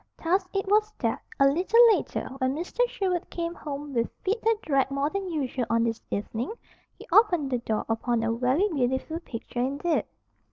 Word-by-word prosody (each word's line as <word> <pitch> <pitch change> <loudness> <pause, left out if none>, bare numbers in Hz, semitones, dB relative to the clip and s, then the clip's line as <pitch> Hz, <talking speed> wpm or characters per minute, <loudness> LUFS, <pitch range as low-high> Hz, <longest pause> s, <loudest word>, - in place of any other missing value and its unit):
Thus 370 +3 +2
it 390 0 -1
was 425 +1 +3
that, - - -1 0.2
a 275 - +6
little 360 +11 +3 0.2
later, - - -3
when 260 0 +1
Mr. 345 +9 -6
Sherwood 370 -6 -2
came 335 0 -3
home 290 -3 -6
with 235 -2 0
feet 420 +5 0
that 450 -1 +2
dragged 275 -3 +2
more 275 +2 -1
than 395 -2 -3
usual 265 -5 -2
on 230 0 +3
this 230 -1 -1
evening, 220 - -3 0.5
he - - -12
opened 350 -11 +4
the 250 - +1
door 220 -2 -2
upon 225 +1 0
a 225 - +1
very 255 - +2
beautiful 265 +1 -1
picture 240 -6 -7
indeed. 280 +6 0
285 Hz, 185 wpm, -27 LUFS, 250-365 Hz, 0.5 s, a